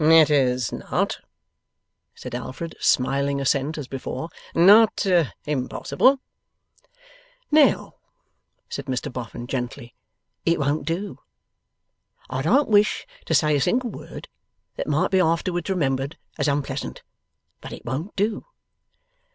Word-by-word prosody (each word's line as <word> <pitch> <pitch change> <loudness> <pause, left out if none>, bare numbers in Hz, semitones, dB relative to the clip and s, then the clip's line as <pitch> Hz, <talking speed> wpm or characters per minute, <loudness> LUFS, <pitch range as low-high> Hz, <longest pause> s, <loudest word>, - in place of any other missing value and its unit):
'It 160 -1 +7
is 130 -4 +2
not,' - - -2 1.0
said - - -9
Alfred, 130 +7 -6
smiling 140 +2 +2
assent 140 +3 0
as 145 -4 -5
before, 135 +5 -5 0.3
'not 205 +5 +6 0.4
impossible.' 150 - +1 1.3
'Now,' 300 -1 +4 0.7
said - - -6
Mr 130 -1 -3
Boffin, 120 -1 -6
gently, 120 -2 -5 0.5
'it 165 -1 +2
won't 145 +1 -1
do. 185 +5 -3 1.1
I 130 - -1
don't 255 - +3
wish 210 0 +3 0.2
to 160 - +2
say 150 +1 +3
a 140 - +1
single 245 - +1
word - - -9 0.5
that - - -4
might - - +1
be 190 - +4
afterwards 175 +1 0
remembered 140 -5 -1 0.2
as - - +1
unpleasant; 140 -1 -2 0.6
but - - -9
it - - -9
won't 145 - -4
do. 210 - -1
150 Hz, 120 wpm, -24 LUFS, 135-185 Hz, 1.3 s, It